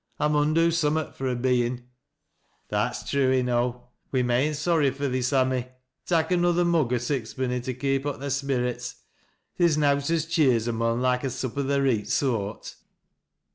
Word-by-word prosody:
I 150 - +2
mun 150 +1 +2
do 165 0 +4
summat 160 -1 0
fur 135 - -3
a 125 - 0
bein'." 120 0 0 0.4
" - - -44
That's - - -2
true 135 -2 +2
enow. 125 -1 0 0.2
We're 130 -2 +1
main 125 +5 +1
sorry 150 -1 +2
fur 140 +2 -3
thee, 130 -1 -1
Sammy 130 -1 +1 0.4
Tak' 165 -1 +1
another 175 0 +2
mug 165 -8 +2
o' 125 - +2
sixpenny 125 0 -2
to 125 0 -4
keep 135 +2 -1
up 145 - -2
tliy 140 0 -5
sperrets. 125 -3 -2 0.6
Theer's 170 -3 +4
nowt 140 -1 +2
as 165 -1 +1
cheers 135 -9 +2
a 120 - 0
mon 115 +1 0
loike 125 0 +1
a - - 0
sup 130 -1 -4
o' 140 - 0
th' 140 +1 +1
reet 125 -7 0
soart." 110 -6 -2
130 Hz, 175 wpm, -26 LUFS, 125-150 Hz, 0.6 s, do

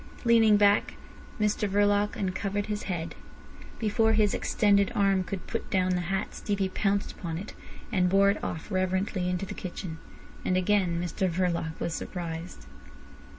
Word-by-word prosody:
Leaning 225 -3 +6
back, 205 0 +3 0.4
Mr 210 -1 +1
Verloc 205 +1 +2
uncovered 200 +1 -2
his 210 -1 -3
head. 170 -3 -3 0.6
Before 220 0 +2
his 215 -2 +3
extended 200 -2 +2
arm 195 -2 +3
could 185 +1 -6
put 230 - -4
down 185 -2 +2
the 180 -1 +1
hat 195 +1 -2
Stevie 200 -2 -1
pounced 200 +1 0
upon 165 -3 -5
it, 200 +5 -7 0.4
and 180 -4 +2
bore 200 +1 +5
it 200 - -5
off 165 +5 -5
reverently 185 0 0
into 180 +1 -1
the 200 - -6
kitchen. 175 -4 -6 0.4
And 185 - +1
again 185 -2 +2
Mr 180 +2 -1
Verloc 170 -2 -1
was 170 - -2
surprised. 165 - -6
195 Hz, 150 wpm, -28 LUFS, 180-205 Hz, 0.6 s, Leaning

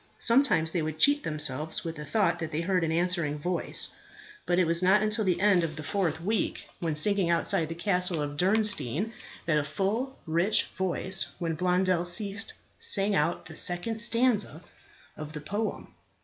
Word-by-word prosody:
Sometimes 230 - +3
they 170 - -1
would 155 0 -4
cheat 285 - +4
themselves 155 - -2
with 165 -1 -5
the 150 - -7
thought 175 -1 0
that 160 -2 -4
they 155 - -3
heard 180 0 0
an 160 - -1
answering 170 -3 -1
voice; 175 +4 -2 0.6
but 175 - +1
it 180 - +3
was 170 +1 +1
not 190 +3 +3
until 215 +1 +2
the 185 -3 0
end 195 -3 +3
of 155 -2 -4
the 155 - -7
fourth 165 -1 -2
week, 205 +4 -2
when 165 -3 -2
singing 195 +2 +5
outside 165 -1 +2
the 165 - -5
castle 180 -1 +1
of 145 -1 -4
Diernstein, 200 - +1 0.3
that 155 -3 +1
a - - -2
full 215 - -3
rich 170 +6 +2
voice, 185 -3 0
when 165 -2 -3
Blondel 180 +1 0
ceased, 200 +3 -1 0.3
sang 200 -1 +3
out 170 -1 -1
the - - -11
second 180 +6 +2
stanza 230 - +1 0.5
of 155 0 -8
the 150 - -7
poem. 205 +8 -5
175 Hz, 175 wpm, -27 LUFS, 160-205 Hz, 0.6 s, singing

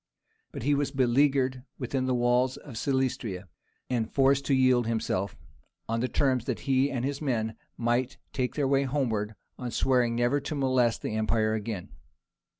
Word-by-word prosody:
But - - -6
he 145 +3 +3
was 145 0 +1
beleaguered 130 0 +2 0.2
within 130 0 -2
the 130 - +2
walls 125 +1 +2
of 135 -6 -11
Silistria, 120 -7 -1 0.4
and 115 -3 -1
forced 140 0 +3
to 140 - +3
yield 130 -2 +4
himself, 100 -4 -1 0.5
on 115 +1 -1
the 125 - 0
terms 130 -3 +1
that - - -3
he 135 +1 +2
and 130 -2 -2
his 140 +1 -3
men 110 -6 -1 0.2
might 120 +2 0 0.2
take 125 -2 -1
their 145 -3 +1
way 135 0 +3
homeward, 120 -6 -1 0.2
on 125 -1 -3
swearing 120 -1 +2
never 120 +4 +2
to 150 - -4
molest 130 -4 +2
the - - -2
empire 110 0 +1
again. 105 -4 -4
125 Hz, 165 wpm, -28 LUFS, 115-135 Hz, 0.5 s, yield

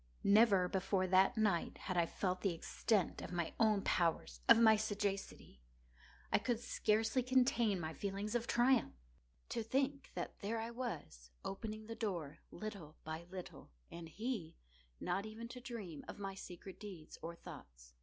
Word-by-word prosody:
Never 200 -3 +6
before 190 0 +1
that 190 +5 +4
night 210 -6 +1
had 185 - -4
I 170 -1 +3
felt 185 0 -1
the 190 -4 +1
extent 195 +3 0
of - - -6
my 170 -2 -1
own 215 -3 +4
powers—of 160 - +3
my 220 -1 +7
sagacity. 205 - -3 0.7
I - - +6
could 235 +1 0
scarcely 220 +1 +2
contain 245 -5 +3
my 160 -1 -3
feelings 200 +3 -3
of 235 -1 0
triumph. 240 - +3 0.5
To - - -1
think 270 +4 0
that - - -4
there 225 +3 -2
I 225 +1 -3
was, 155 - -5 0.2
opening 215 +2 -4
the 230 - -5
door, 175 -10 -3
little 195 -8 -7
by 160 +2 -5
little, 185 -1 -8 0.2
and 170 -1 -7
he 215 - -3 0.4
not 195 +4 -1
even 225 +2 -7
to 250 0 -8
dream 220 - -6
of - - -7
my 195 -1 -4
secret 190 0 -9
deeds 185 -7 -9
or 170 +1 -5
thoughts. - - -12
200 Hz, 155 wpm, -37 LUFS, 175-225 Hz, 0.7 s, my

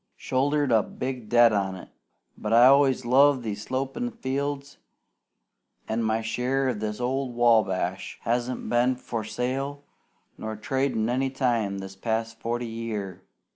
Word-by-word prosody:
Shouldered 145 +1 0
a 110 -2 +5
big 125 -1 -5
debt 120 -1 +6
on 95 -2 0
it; 90 - -11 0.5
but 105 - -5
I 120 +2 +7
always 135 -1 +5
loved 135 +1 +4
these 105 -2 -4
slopin' 135 - -3
fields, 140 - -4 1.1
an' 110 +1 -1
my 110 0 0
share 125 +4 0
of 115 -5 -2
this 105 0 -3
old 130 0 -2
Wabash 105 -6 +1
hasn't 120 +2 -1
been 120 +2 +2
for 115 -2 -5
sale 135 +5 -3 0.6
nor 110 0 -4
tradin' 125 0 -1
any 130 +2 0
time 120 -7 0
this 95 0 -8
past 115 +2 -3
forty 120 +1 -2
year. 110 -5 -5
120 Hz, 140 wpm, -26 LUFS, 110-130 Hz, 1.1 s, I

